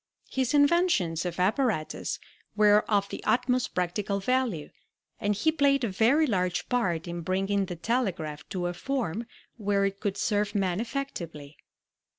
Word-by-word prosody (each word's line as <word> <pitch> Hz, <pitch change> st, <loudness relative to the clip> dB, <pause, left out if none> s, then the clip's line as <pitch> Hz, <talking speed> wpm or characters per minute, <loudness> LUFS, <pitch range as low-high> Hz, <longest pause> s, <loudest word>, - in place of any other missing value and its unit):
His 260 Hz, +1 st, 0 dB
inventions 285 Hz, -, +3 dB
of 175 Hz, 0 st, -5 dB
apparatus 205 Hz, -, 0 dB, 0.4 s
were 210 Hz, 0 st, +6 dB
of 200 Hz, -2 st, +2 dB
the -, -, -6 dB
utmost 250 Hz, +1 st, +1 dB
practical 200 Hz, +3 st, -1 dB
value, 230 Hz, -, 0 dB, 0.5 s
and 205 Hz, 0 st, 0 dB
he 315 Hz, +10 st, +2 dB
played 280 Hz, -3 st, +3 dB
a 230 Hz, -, +1 dB
very 235 Hz, +11 st, +3 dB
large 180 Hz, -, 0 dB
part 180 Hz, -9 st, 0 dB
in 170 Hz, 0 st, -4 dB
bringing 195 Hz, +3 st, 0 dB
the 175 Hz, -, -5 dB
telegraph 170 Hz, -, -2 dB
to 180 Hz, -2 st, -3 dB
a 175 Hz, -, -1 dB
form 230 Hz, -2 st, -3 dB, 0.3 s
where 200 Hz, -2 st, +1 dB
it 195 Hz, 0 st, -2 dB
could 205 Hz, -2 st, -2 dB
serve 205 Hz, -1 st, 0 dB
man 190 Hz, -2 st, +1 dB
effectively. 170 Hz, -, -5 dB
205 Hz, 150 wpm, -28 LUFS, 180-250 Hz, 0.5 s, were